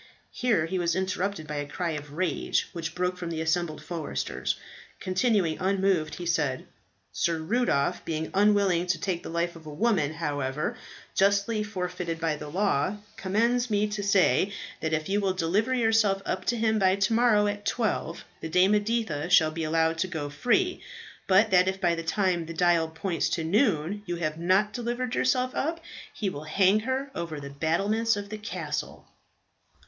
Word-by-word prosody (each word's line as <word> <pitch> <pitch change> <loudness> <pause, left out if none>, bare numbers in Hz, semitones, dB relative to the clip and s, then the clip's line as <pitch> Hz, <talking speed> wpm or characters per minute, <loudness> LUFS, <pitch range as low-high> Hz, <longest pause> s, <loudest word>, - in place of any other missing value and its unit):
Here 230 -11 +1
he 185 +2 -2
was 170 -1 +1
interrupted 190 -2 -2
by 150 -1 -5
a 145 0 -3
cry 170 +3 -3
of 145 -2 -6
rage 165 -2 0
which 165 -2 -5
broke 180 0 -1
from 175 -2 -5
the 165 -1 -3
assembled 160 0 -1
foresters. 170 -4 -3 0.4
Continuing 185 -3 +1
unmoved, 190 -4 +1
he 175 - -6
said, 150 -6 0 0.5
"Sir 170 -1 0
Rudolph, 160 - 0
being 160 -1 -3
unwilling 200 -3 +3
to 175 -2 0
take 180 -1 -2
the - - -8
life 170 +1 -1
of 160 -2 -12
a - - -6
woman, 160 -4 +1
however 145 -3 -2 0.4
justly 200 +3 +2
forfeited 180 -5 -4
by 165 -2 0
the 150 0 -8
law, 185 0 0 0.2
commands 235 +4 +1
me 210 -1 +2
to 210 0 -3
say, 200 0 +3 0.3
that 160 - -2
if 155 -1 -1
you 205 +1 +1
will 195 -2 +1
deliver 190 +8 +1
yourself 225 -5 +2
up 185 0 -2
to 240 - +1
him 220 -1 +2
by 190 -1 +4
to 200 +3 +1
morrow 225 -3 +4
at 205 0 -2
twelve, 210 -9 -2
the 160 - -5
Dame 180 +4 +4
Editha 210 -7 0
shall 160 -3 +5
be 165 +1 -4
allowed 160 +1 +1
to 185 - +1
go 155 -5 -4
free. 360 - +1 0.5
But 200 +3 +4
that 180 0 +5
if 190 0 -1
by 175 -2 +2
the 165 - -3
time 175 -1 0
the 165 - -7
dial 170 -1 +3
points 165 +2 -2
to 165 - -2
noon 195 - +1
you 175 - -2
have 155 -2 -3
not 190 +5 +2
delivered 245 +1 -3
yourself 255 0 +1
up, 330 +3 -1 0.3
he 210 - -3
will 155 -5 -5
hang 190 +6 +3
her 270 +1 -1
over 165 -3 -4
the 140 -1 -8
battlements 200 +10 +1
of 200 0 -6
the 215 0 -6
castle." 210 - -5
185 Hz, 180 wpm, -27 LUFS, 160-210 Hz, 0.5 s, shall